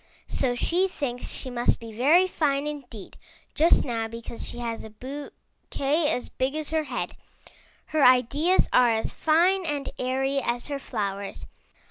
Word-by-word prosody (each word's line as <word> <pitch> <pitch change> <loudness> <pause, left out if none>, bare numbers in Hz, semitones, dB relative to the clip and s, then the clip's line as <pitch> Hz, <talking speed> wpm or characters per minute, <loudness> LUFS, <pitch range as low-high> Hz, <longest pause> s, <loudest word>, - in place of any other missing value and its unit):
So 250 -2 0
she 355 +9 +2
thinks 255 -9 -4
she 255 - -4
must 240 0 +1
be 230 -1 -9
very 300 +11 +5
fine 290 -6 0
indeed 265 -9 -7 0.4
just 325 +3 +4
now 230 -3 -2
because 230 +1 -7
she - - -8
has 235 -1 -4
a 220 - -9
bouquet 285 +4 -3
as 250 -6 -1
big 260 +3 -2
as 310 -1 -2
her 315 -1 0
head. - - -4 0.7
Her 310 -2 +1
ideas 270 +8 +4
are 245 -1 +6
as 220 -1 0
fine 355 +5 +3
and 295 -4 -3
airy 270 +2 0
as 240 -2 -2
her 285 -1 -3
flowers. 200 -6 -4
270 Hz, 155 wpm, -26 LUFS, 240-305 Hz, 0.7 s, are